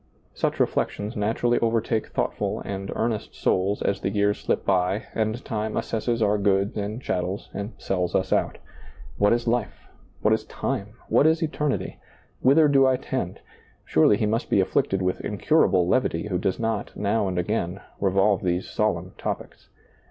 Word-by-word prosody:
Such - - -1
reflections 105 +2 -1
naturally 115 +3 +1
overtake 115 -1 0
thoughtful - - -2
and 95 -1 -5
earnest 110 -2 -2
souls 95 +3 0
as 100 - 0
the - - 0
years 105 0 +1
slip - - -1
by 95 +3 +1
and 110 +3 -1
time 110 -3 -2
assesses 115 +1 -1
our 105 0 +2
goods 100 0 +1
and 105 +2 -3
chattels 90 -5 -3
and 100 +3 -5
sells 90 -2 -1
us 95 0 +1
out - - 0 0.6
What 105 0 +4
is 120 0 +1
life? 120 +1 -2 0.3
What - - +4
is - - 0
time? 100 +1 -3
What 150 - +4
is 160 +1 +2
eternity? 150 -2 -2 0.4
Whither 150 +4 +5
do 135 -2 +5
I 130 -1 +3
tend? 125 -8 -4 0.4
Surely 80 +6 +4
he 110 - 0
must 110 +3 -1
be - - +3
afflicted 95 0 +1
with 90 0 -1
incurable 100 - +2
levity 105 -4 +1
who 90 -2 0
does 95 +1 0
not, 110 -2 -2
now 105 0 +1
and 90 -1 -2
again, 90 0 -1 0.2
revolve 100 +1 +2
these 90 0 -1
solemn 95 -4 -1
topics. - - -5
105 Hz, 165 wpm, -25 LUFS, 95-115 Hz, 0.6 s, Whither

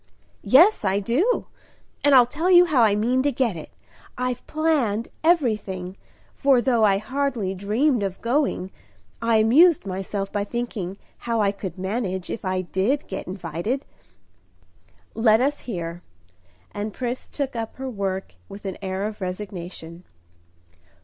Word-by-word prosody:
"Yes, 340 - +5
I 195 0 +1
do, 270 - +1 0.6
and 285 -1 +6
I'll 250 -2 +8
tell 310 +9 -2
you 355 -1 +8
how 295 -8 +2
I 215 -3 +4
mean 240 +5 +1
to 285 +2 +1
get 245 -8 0
it. 160 - -8 0.5
I've 250 0 -2
planned 285 -9 0
everything; 210 - +1 0.4
for, 275 -3 +3
though 240 -2 +2
I 200 -2 +4
hardly 245 -3 -2
dreamed 220 +7 +1
of 195 -2 -3
going, 235 -7 0 0.5
I 230 0 +2
amused 265 - +5
myself 195 +1 -4
by 205 -1 -1
thinking 205 -4 -4 0.3
how 230 -1 +1
I 200 -2 +3
could 195 -3 -7
manage 190 -1 -3
if 230 - -5
I 185 -1 -1
did 195 +10 -1
get 190 - -6
invited." 180 - -3 1.3
"Let 220 -1 +4
us 285 +3 0
hear." 170 -4 -4 0.7
And 205 0 -5
Pris 250 0 -4
took 275 -3 -4
up 225 -1 -4
her 265 0 -6
work 195 -5 -3 0.2
with 200 +1 -10
an 190 - -5
air 190 +1 -3
of 215 -1 -6
resignation. 180 -3 -6
215 Hz, 145 wpm, -24 LUFS, 190-260 Hz, 1.3 s, I'll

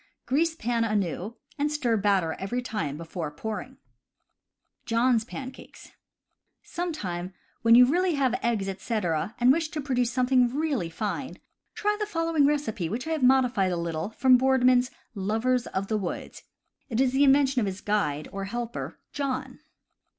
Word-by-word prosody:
Grease 320 +5 +1
pan 235 -3 0
anew 210 -1 -1 0.2
and 295 +1 +1
stir 250 -6 +1
batter 195 -6 +2
every 240 +6 -3
time 205 - -3
before 165 -1 -5
pouring. 220 - -6 1.1
John's 235 0 +2
Pancakes. 260 +2 -10 0.4
— - - -53 0.2
Some 350 0 0
time 185 - -5 0.3
when 230 0 +6
you 250 +1 +9
really 350 +5 +1
have 265 -4 +1
eggs, 225 -5 0
etc., 195 -2 -2
and 245 +1 +6
wish 320 +2 +1
to 310 - -5
produce 250 -4 0
something 250 0 +2
really 280 - -1
fine, 210 +8 -4 0.4
try 420 0 +1
the 420 - -1
following 330 -6 +2
recipe, 225 - -1
which 235 +7 -3
I 325 - -3
have 315 -2 -1
modified 250 -7 +3
a 175 - -1
little 165 +1 -3
from 255 +3 +5
Boardman's 255 -1 +3 0.2
Lovers 225 +5 0
of 190 +1 -2
the 215 - 0
Woods. 185 -4 -5 0.5
It 230 -1 -1
is 260 -1 +3
the 265 +2 +1
inven 280 0 +6
tion 265 -1 0
of 210 - 0
his 190 0 -5
guide, 155 -9 -1
or 195 0 -4
helper, 240 +3 -5
John. 265 -2 -3
240 Hz, 165 wpm, -27 LUFS, 200-270 Hz, 1.1 s, you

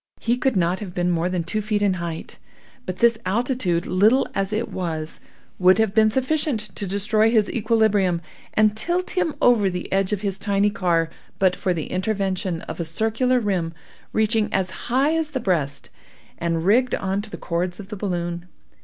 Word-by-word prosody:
He 235 +1 +1
could 255 -1 0
not 180 0 +1
have 190 -4 -7
been 180 0 +1
more 170 +1 0
than 180 -2 -1
two 215 +6 -2
feet 210 -1 0
in 200 -2 +3
height; 165 -1 -6 0.5
but 185 0 -3
this 235 -1 +3
altitude, 200 -5 0
little 215 +8 +3
as 195 0 -1
it 220 +2 -1
was, 160 -4 -4 0.4
would 185 0 +6
have 220 -3 +2
been 220 0 +5
sufficient 265 +2 0 0.2
to 200 - -3
destroy 215 +3 +2
his 220 -3 +2
equilibrium, 210 -6 +2 0.4
and 215 -1 +4
tilt 350 +10 -1
him 330 -5 0
over 220 -5 +5
the 180 0 -5
edge 195 0 +1
of 205 -2 -1
his 195 -2 -2
tiny 200 0 +2
car, 170 -4 +1 0.3
but 185 -2 +3
for 185 - -1
the 165 -4 -3
intervention 185 -3 -1
of - - -7
a - - 0
circular 225 +9 +1
rim 180 -7 -1 0.4
reaching 220 0 +1
as 190 -1 0 0.2
high 270 +6 +3
as 320 -2 0
the 280 -3 -3
breast, 160 - -1 0.5
and 165 -1 -1
rigged 245 +6 +3
on 195 +1 -1
to 215 - -10
the - - -7
cords 175 +2 -2
of 200 -1 -9
the 210 - -5
balloon. 175 -3 -3
200 Hz, 190 wpm, -23 LUFS, 180-220 Hz, 0.5 s, would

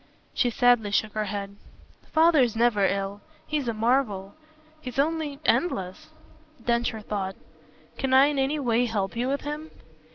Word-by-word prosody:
She 245 - +2
sadly 240 -2 +3
shook 210 +1 0
her 215 0 -1
head. 200 0 -5 0.5
"Father's 310 -8 +4
never 225 -4 +3
ill. 195 +1 -3 0.2
He's 295 -4 -2
a 230 - 0
marvel. 215 -4 0 0.5
He's 250 -4 -7
only 300 0 0
endless." 190 - 0 0.6
Densher 235 -2 0
thought. 195 -2 -4 0.6
"Can 265 -1 -1
I 265 +1 +7
in 290 -1 0
any 270 +3 +1
way 245 -2 +2
help 200 -3 -2
you 245 +2 -1
with 280 +1 -1
him?" 300 +2 -5
240 Hz, 150 wpm, -26 LUFS, 205-275 Hz, 0.6 s, I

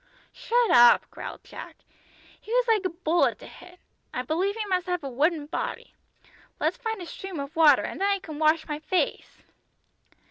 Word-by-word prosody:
"Shut 480 0 +1
up," 240 0 +7
growled - - -8
Jack; - - -10 0.7
"he 440 - -11
was - - +2
like 440 -3 +3
a - - +1
bullet 335 0 +1
to - - -13
hit. 360 0 -14 0.3
I 250 - -3
believe 360 +9 -1
he 445 -1 -3
must 370 -2 -1
have 360 -3 -2
a 275 - -4
wooden 300 +4 +1
body. 295 - -5 0.7
Let's - - 0
find 445 -4 -4
a - - -7
stream 370 0 -7
of 280 +3 -6
water, 305 -4 +6
and - - -6
then 395 - +2
I 400 - +2
can 315 -6 -9
wash 315 +1 +2
my 300 -1 -4
face!" 360 +4 -2
350 Hz, 185 wpm, -26 LUFS, 310-395 Hz, 0.7 s, up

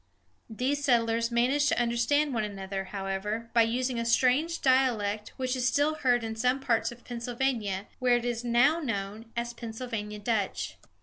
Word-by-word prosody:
These 265 +6 -1
settlers 230 -3 +2
managed 255 +5 +2
to - - +2
understand 240 +5 +1
one 225 -2 0
another, 195 -1 -4
however, 200 +4 -4
by 235 - +5
using 245 +2 0
a - - 0
strange 265 +8 +2
dialect, 230 -6 +2
which 255 0 -1
is 250 -1 +1
still 290 +4 +2
heard 250 -6 +1
in 225 0 -4
some 250 +4 +1
parts 235 -4 +1
of 240 0 -14
Pennsylvania, 235 -5 -2
where 250 -2 +4
it 240 - -4
is 240 -1 -2
now 245 +7 +3
known 220 -4 -4
as 235 0 -2
"Pennsylvania 225 -2 -5
Dutch." 210 -2 -2
235 Hz, 165 wpm, -28 LUFS, 220-255 Hz, -, by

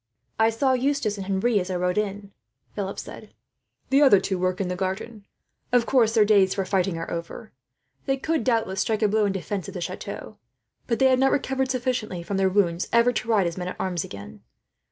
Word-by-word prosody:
"I 220 0 +5
saw 260 +4 +1
Eustace 255 -5 0
and 190 - -6
Henri, 200 +3 +1
as 180 0 -4
I 185 - -2
rode 180 +2 0
in," 200 -1 -4 0.4
Philip 200 -1 -4
said. - - -9 0.6
"The 275 +2 +5
other 265 -9 +7
two 190 -1 -2
work 185 +1 0
in 195 - -1
the 180 - -2
garden. 195 +3 -4 0.4
Of 245 -1 +3
course, 235 -4 +3
their 215 -2 +5
days 200 -3 +4
for 195 -1 -1
fighting 185 -2 0
are 165 - -5
over. 170 +6 -6 0.6
They 270 0 +1
could 315 0 -1
doubtless 225 -6 0
strike 220 -1 0
a - - +5
blow 215 +1 +2
in 200 - +1
defence 195 -1 -4
of - - -9
the - - -3
chateau, - - -6 0.5
but 230 - 0
they 265 - +3
have 260 -1 +4
not 270 0 +4
recovered 265 -1 0
sufficiently 245 -8 -2
from 195 +3 -3
their 190 0 +3
wounds 180 -3 +1
ever 235 +1 +4
to 220 - -3
ride 210 -5 +3
as 170 +1 -3
men 180 - -4
at 180 - -6
arms 180 -3 -1
again. 100 -8 -10
205 Hz, 215 wpm, -25 LUFS, 185-240 Hz, 0.6 s, other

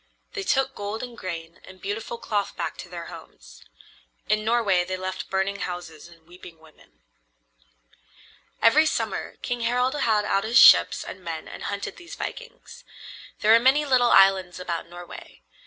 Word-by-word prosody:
They 410 - -3
took 270 -7 0
gold 205 +1 -5
and 245 -1 -8
grain 170 -5 -7
and 185 0 -14
beautiful 210 +4 -5
cloth 205 -3 -3
back - - -3
to - - -9
their - - -7
homes. - - -13 0.6
In 215 0 +1
Norway 215 -5 +2
they 185 +1 -4
left 185 0 -5
burning 190 +1 -1
houses 175 -6 -7
and 165 -2 -19
weeping 175 -1 -14
women. 160 - -22 1.6
Every 305 +8 +6
summer - - -3
King 245 -1 -3
Harald 250 +3 +1
had 225 -7 +1
out 195 -1 +1
his 230 +2 +2
ships - - +7
and 185 - -10
men 165 -2 -6
and - - -9
hunted 200 0 -5
these 345 0 -10
vikings. - - -8 0.6
There 215 +1 +5
are 230 - +7
many 270 +5 +3
little 255 -3 +3
islands 190 -2 +4
about 170 -2 -5
Norway. 175 - -12
205 Hz, 160 wpm, -24 LUFS, 180-240 Hz, 1.6 s, ships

